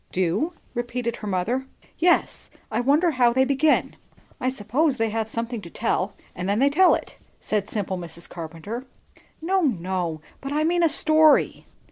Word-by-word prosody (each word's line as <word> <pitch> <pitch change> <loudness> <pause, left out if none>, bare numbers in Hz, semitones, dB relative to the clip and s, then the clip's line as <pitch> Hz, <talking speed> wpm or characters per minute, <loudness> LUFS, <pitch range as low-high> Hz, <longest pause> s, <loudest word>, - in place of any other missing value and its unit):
"Do?" 190 - 0 0.2
repeated 240 0 -3
her 210 - -7
mother. 225 +8 -1 0.3
"Yes. 345 +2 +2 0.2
I - - 0
wonder 295 +7 +3
how 245 -4 +3
they 260 +1 +3
begin." 280 +3 +2 0.4
"I 255 - 0
suppose 260 +5 0
they 225 -2 0
have 220 0 -2
something 230 0 -4
to 170 - -10
tell; 205 -1 -1 0.2
and 180 +2 -3
then 200 - +1
they 275 +4 +3
tell 370 +5 +5
it," - - -8 0.2
said 210 -2 -2
simple 195 -3 -3
Mrs. 170 0 -9
Carpenter. 175 +10 -7 0.6
"No, 380 +3 +2
no, 180 - -1 0.2
but 275 - -5
I 305 +1 +1
mean 345 +2 +2
a 335 - +4
story." 310 0 +4
240 Hz, 165 wpm, -24 LUFS, 195-290 Hz, 0.6 s, tell